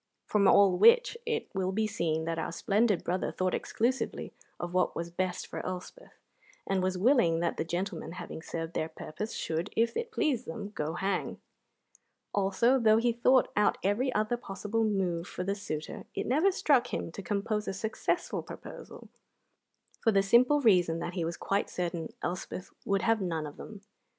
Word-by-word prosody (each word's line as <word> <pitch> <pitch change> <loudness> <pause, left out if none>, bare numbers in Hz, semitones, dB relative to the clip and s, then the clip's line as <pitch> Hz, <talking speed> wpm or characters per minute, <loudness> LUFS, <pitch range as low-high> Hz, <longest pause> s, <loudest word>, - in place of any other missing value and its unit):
From 200 -2 +3
all 190 -3 +5
which 470 +1 +6
it 455 -1 -1
will 190 -1 0
be 215 +3 +1
seen 160 -6 -1
that 165 0 -2
our 160 - -3
splendid 205 +3 +1
brother 180 +2 -1
thought 185 0 -1
exclusively 250 +4 -1 0.3
of 175 0 -4
what 185 0 +1
was 170 0 -4
best 180 +1 -2
for - - -6
Elspeth, 185 - -7 0.5
and 195 -1 0
was 185 0 0
willing 185 -6 +4
that 170 - -1
the - - 0
gentlemen, 175 +2 -4
having 170 - -7
served 165 0 -5
their 155 - -1
purpose, 210 +9 -6
should, 165 +5 -2
if 230 +1 +2
it 470 0 -3
pleased 295 - 0
them, 200 +5 -6
go 155 -5 -3
hang. 195 +1 -2 0.9
Also, 205 +6 +3
though 220 -2 +5
he 235 +1 +2
thought 250 +2 +4
out 210 0 +3
every 220 +7 +1
other 215 +3 +1
possible 210 +1 -2
move 185 -5 0
for 180 - -5
the 195 +2 0
suitor, 160 -7 -5
it - - -2
never 310 +10 +3
struck 270 -9 +2
him - - -3
to 200 - -7
compose 210 +3 -2
a - - 0
successful 220 +3 -2
proposal, - - -10 0.9
for 225 - +3
the 195 -2 +3
simple 250 +8 +5
reason 180 -8 +4
that 170 +1 -4
he 175 -2 -2
was 170 +1 -3
quite 200 +1 -1
certain 170 -2 -3
Elspeth 180 +1 -4
would 195 -1 +1
have 225 -2 +2
none 165 -4 -2
of 145 - -9
them. 210 -3 -10
195 Hz, 180 wpm, -30 LUFS, 175-225 Hz, 0.9 s, which